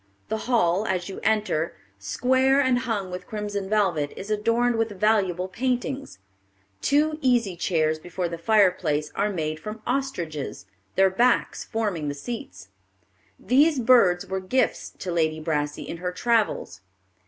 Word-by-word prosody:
The 220 +3 -3
hall, 205 -3 +2
as 185 0 -1
you 190 - -6
enter, 210 -7 0 0.2
square 260 - +2
and 260 -3 +3
hung 215 -7 -3
with 180 0 -7
crimson 205 -2 -4
velvet, 185 -9 +1
is 200 +3 -6
adorned 230 +3 +1
with 220 -4 -2
valuable 190 -4 +2
paintings. 255 +6 -2 0.6
Two 305 +2 +2
easy 240 -8 +2
chairs 160 -3 0
before 175 +2 -3
the 170 0 -6
fireplace 175 -6 +2
are 205 +1 0
made 155 -5 -3
from 215 +6 -8
ostriches, 175 - -3 0.3
their 190 0 +4
backs 240 +6 +2
forming 205 -9 -2
the 145 - -3
seats. 140 - -7 0.7
These 280 +6 +3
birds 225 -8 +4
were 190 0 -3
gifts 220 +8 0
to 185 - -4
Lady 160 -2 +1
Brassey 150 -2 -2
in - - -5
her 180 +1 -3
travels. 210 - 0
200 Hz, 140 wpm, -25 LUFS, 170-235 Hz, 0.7 s, their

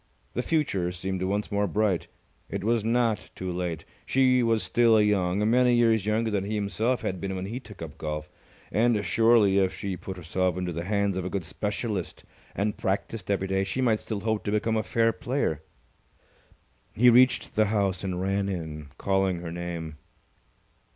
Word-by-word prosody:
The 125 - -1
future 125 - 0
seemed 95 +1 -4
once 100 +3 -1
more 100 0 +1
bright. 105 -2 0 0.4
It - - -4
was 115 0 +1
not 115 -1 +1
too 95 -1 -4
late. 90 -2 -3 0.2
She 130 -1 +3
was 115 -2 +2
still 115 -2 +4
young, 105 -1 +2
many 125 +1 +4
years 115 -3 +3
younger 110 +1 +1
than 100 -2 0
he 105 +2 -3
himself 110 +4 -1
had 95 -2 -3
been 95 -1 -3
when 95 0 -4
he 115 +6 -4
took 105 -9 -11
up 80 -1 -9
golf, 75 0 -4 0.4
and 110 -2 +2
surely, 110 0 +4
if 95 -1 0
she 100 -2 -3
put 95 +1 -7
herself 90 +1 -1
into 90 -1 -2
the 85 +1 -4
hands 100 -1 0
of 95 - -3
a - - -2
good 95 -3 -3
specialist 105 +1 -3 0.3
and 105 +1 -1
practised 100 +1 -3
every 95 -1 0
day, 95 0 +1
she 95 +7 -3
might 115 -4 +2
still 105 -3 -4
hope 110 0 -1
to 105 - -1
become 110 +1 +1
a 110 - +2
fair 115 0 +1
player. 130 - -1 1.3
He 120 +2 +6
reached 125 +2 +4
the 110 - +4
house 100 -3 0
and 90 -2 -2
ran 95 +1 0
in, 80 -5 -5
calling 95 -2 +1
her 85 -1 -6
name. 85 -2 -5
100 Hz, 185 wpm, -27 LUFS, 90-115 Hz, 1.3 s, He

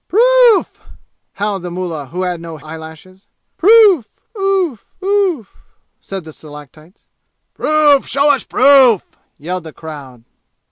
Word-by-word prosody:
"Proof!" 485 0 +3 0.5
howled 205 -2 -3
the 175 - -6
mullah 170 -5 -5
who 180 +7 -5
had 180 -2 -3
no 165 -1 -9
hair 155 +1 -15
eyelashes. 160 +4 -12 0.3
"Proof 400 - +4 0.2
oof 385 - -2
oof!" 380 - -1 0.4
said 195 -2 -8
the 155 -1 -12
stalactites. 155 +4 -15 0.5
"Proof! 300 -2 +2
Show 285 +1 +2
us 275 - -3
proof!" 260 -6 +4 0.3
yelled 180 +3 -5
the 160 - -10
crowd. 140 -7 -11
195 Hz, 125 wpm, -15 LUFS, -, 0.5 s, Proof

